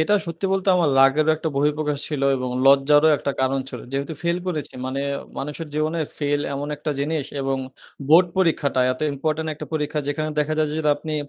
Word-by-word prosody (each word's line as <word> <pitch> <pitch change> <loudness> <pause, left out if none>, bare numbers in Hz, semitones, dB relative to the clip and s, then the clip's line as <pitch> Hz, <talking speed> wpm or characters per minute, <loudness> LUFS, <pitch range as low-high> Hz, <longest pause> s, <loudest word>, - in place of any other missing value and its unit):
এটা 205 +6 +3
সত্যি 170 +3 -3
বলতে 195 0 0
আমার 165 -5 +2
লাকেরও 145 +4 +4
একটা 160 - -3
বহিঃপ্রকাশ 150 +1 0
ছিল 150 -3 -3
এবং 125 -1 -3 0.2
লজ্জারও 145 +3 +6
একটা 140 - -2
কারণ 130 +1 +1
ছিল। 125 -3 -7
যেহেতু 140 +3 -2
ফেইল 170 +1 0
করেছি 155 -6 -3
মানে 135 +1 -3 0.4
মানুষের 150 +3 -5
জীবনে 155 +2 0 0.2
ফেইল 145 -1 0
এমন 145 +1 -4
একটা 150 +1 -3
জিনিস 150 0 -1 0.2
এবং 135 0 0 0.5
বোর্ড 170 +4 +7
পরীক্ষাটা 155 -7 +2
এত 130 - -10
ইম্পোর্টেন্ট 155 +3 -2
একটা 150 - -8
পরীক্ষা 150 -1 -1
যেখানে 155 +2 -1
দেখা 150 +1 0
যায় 155 -1 +2
যে, - - -4
যদি 150 - +1
আপনি 155 +1 -5
150 Hz, 190 wpm, -22 LUFS, 140-160 Hz, 0.5 s, বোর্ড